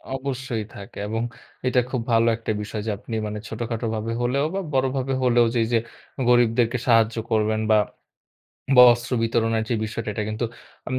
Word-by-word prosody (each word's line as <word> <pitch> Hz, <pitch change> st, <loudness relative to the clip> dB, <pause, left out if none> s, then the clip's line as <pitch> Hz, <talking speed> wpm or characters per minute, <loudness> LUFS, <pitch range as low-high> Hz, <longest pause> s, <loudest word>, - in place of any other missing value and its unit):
অবশ্যই 130 Hz, -4 st, -3 dB
থাকে। 100 Hz, -1 st, -11 dB
এবং 115 Hz, +1 st, -2 dB, 0.5 s
এটা 125 Hz, -, +3 dB
খুব 130 Hz, -3 st, -2 dB
ভালো 115 Hz, +1 st, +4 dB
একটা 115 Hz, -, -3 dB
বিষয়, 105 Hz, 0 st, -5 dB
যে -, -, +1 dB
আপনি 115 Hz, -, -7 dB
মানে 105 Hz, 0 st, -4 dB
ছোটখাটো 115 Hz, 0 st, -3 dB
ভাবে 110 Hz, +1 st, -3 dB
হলেও 135 Hz, +4 st, +1 dB
বা -, -, 0 dB
বড়ভাবে 130 Hz, 0 st, 0 dB
হলেও 120 Hz, -1 st, +4 dB
যেই, 115 Hz, -, +3 dB
যে 115 Hz, -, +5 dB, 0.5 s
গরিবদেরকে 120 Hz, 0 st, +3 dB
সাহায্য 115 Hz, -1 st, +4 dB, 0.2 s
করবেন। 110 Hz, 0 st, +1 dB
বা 110 Hz, -, +6 dB, 1.0 s
বস্ত্র 120 Hz, 0 st, +7 dB
বিতরণের 115 Hz, -1 st, +1 dB
যে 120 Hz, -, +1 dB
বিষয়টা, 110 Hz, +1 st, -5 dB
এটা 105 Hz, -, -2 dB
কিন্তু 110 Hz, +3 st, -2 dB, 0.4 s
উম 130 Hz, -, -2 dB
115 Hz, 165 wpm, -23 LUFS, 110-125 Hz, 1.0 s, বস্ত্র